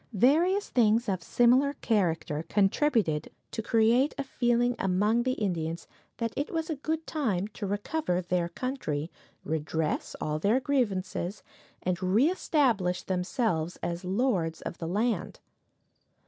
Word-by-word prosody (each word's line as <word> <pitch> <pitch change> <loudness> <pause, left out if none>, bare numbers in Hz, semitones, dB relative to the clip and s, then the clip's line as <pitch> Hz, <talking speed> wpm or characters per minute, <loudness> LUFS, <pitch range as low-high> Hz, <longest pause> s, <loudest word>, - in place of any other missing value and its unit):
Various 330 - +3
things 230 -1 +3
of 190 -3 -1
similar 250 +8 +3
character 165 - 0
contributed 200 - +2 0.2
to 225 - -3
create 230 +5 +3
a 280 - -1
feeling 245 -2 +1
among 205 +5 +2
the 255 +1 0
Indians 170 -7 -2 0.3
that 230 -1 -2
it 285 - -2
was 325 -1 -2
a - - -1
good 315 +3 -3
time 215 - -1
to 210 -2 -5
recover 205 - -1
their 175 -1 -1
country, 170 - -3 0.3
redress 155 0 -2
all 155 0 -2
their 210 +10 +3
grievances, 205 -8 -1 0.4
and 180 -1 -1
reestablish 225 - +2
themselves 180 - -1
as 170 +1 -3
lords 185 -5 0
of - - -6
the 165 - -4
land. 215 +7 -1
210 Hz, 130 wpm, -28 LUFS, 180-255 Hz, 0.4 s, Various